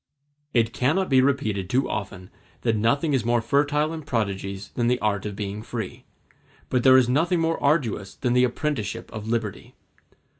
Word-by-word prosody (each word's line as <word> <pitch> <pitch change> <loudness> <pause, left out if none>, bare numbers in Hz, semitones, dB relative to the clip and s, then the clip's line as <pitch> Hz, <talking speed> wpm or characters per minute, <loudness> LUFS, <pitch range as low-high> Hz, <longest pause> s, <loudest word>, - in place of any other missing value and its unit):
It 115 -3 +1
cannot 160 +10 +1
be 130 -2 +5
repeated 110 -9 0
too 130 +4 +1
often 95 -3 -5 0.3
that 115 -2 +1
nothing 140 +8 +1
is 130 -4 +1
more 120 +1 +2
fertile 145 +6 +1
in 160 - -5
prodigies 100 -7 -3
than 120 -1 -1
the 125 +1 +3
art 105 -3 -1
of 105 - -6
being 105 0 -4
free; 110 -3 -6 0.7
but 125 - +2
there 130 +1 +7
is 130 -2 +4
nothing 165 +8 +2
more 165 0 0
arduous 125 - 0
than 125 -3 -1
the 125 0 +4
apprenticeship 125 -4 -2
of 110 0 -6
liberty. 110 -3 -3
120 Hz, 175 wpm, -24 LUFS, 105-140 Hz, 0.7 s, there